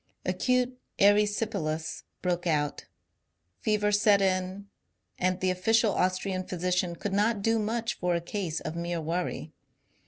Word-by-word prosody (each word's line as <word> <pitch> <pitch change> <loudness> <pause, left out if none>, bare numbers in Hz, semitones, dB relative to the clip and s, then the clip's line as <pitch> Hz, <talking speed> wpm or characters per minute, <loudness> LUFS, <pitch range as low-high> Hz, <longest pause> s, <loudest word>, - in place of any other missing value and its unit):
Acute 250 +7 +1 0.2
erysipelas 205 -6 +1 0.2
broke 175 -1 0
out, 150 -3 0 0.7
fever 210 -1 +1
set 205 0 +5
in, 190 +1 -1 0.5
and 185 0 +1
the 185 0 +2
official 215 +3 +2
Austrian 185 0 0
physician 180 -1 -1
could 200 +3 -4
not 205 +1 +1
do 225 +1 +2
much 225 +1 -2
for 180 -1 +1
a - - +1
case 170 -2 -3
of 155 - -5
mere 170 0 -2
worry. 165 -1 -3
185 Hz, 130 wpm, -28 LUFS, 175-210 Hz, 0.7 s, set